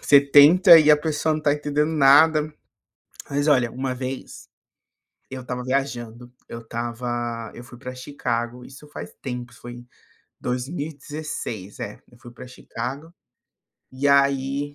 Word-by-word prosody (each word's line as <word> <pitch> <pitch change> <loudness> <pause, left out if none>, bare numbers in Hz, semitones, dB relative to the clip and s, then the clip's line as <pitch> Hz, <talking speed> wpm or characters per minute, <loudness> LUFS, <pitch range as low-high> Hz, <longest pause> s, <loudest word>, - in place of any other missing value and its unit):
você 140 - +6
tenta 155 +6 +7
e 155 -1 +5
a 150 - +7
pessoa 155 +1 -1
não 155 - -1
está 150 -1 +1
entendendo 150 +1 -1
nada. 150 +2 +5 0.8
Mas, 145 +1 -1
olha, 130 -6 +3
uma 130 0 -3
vez, 130 +1 -7 0.8
eu 130 -1 -7
estava 125 0 -5
viajando, 125 -3 -3 0.2
eu 115 - -7
estava 120 0 -5
eu 120 - -10
fui 120 -1 -14
para 130 0 -8
Chicago, 125 -2 -4
isso 135 +3 -14
faz 90 -11 -9
tempo, 125 -2 -6
foi 120 +1 -10
em 120 0 -13 0.5
2016. 140 - -5
É, 105 - -7
eu 120 - -19
fui 120 0 -13
para 120 +1 -12
Chicago, 130 +6 -7 0.8
e 130 +2 -2
aí 140 +1 +1
130 Hz, 140 wpm, -23 LUFS, 120-145 Hz, 0.8 s, tenta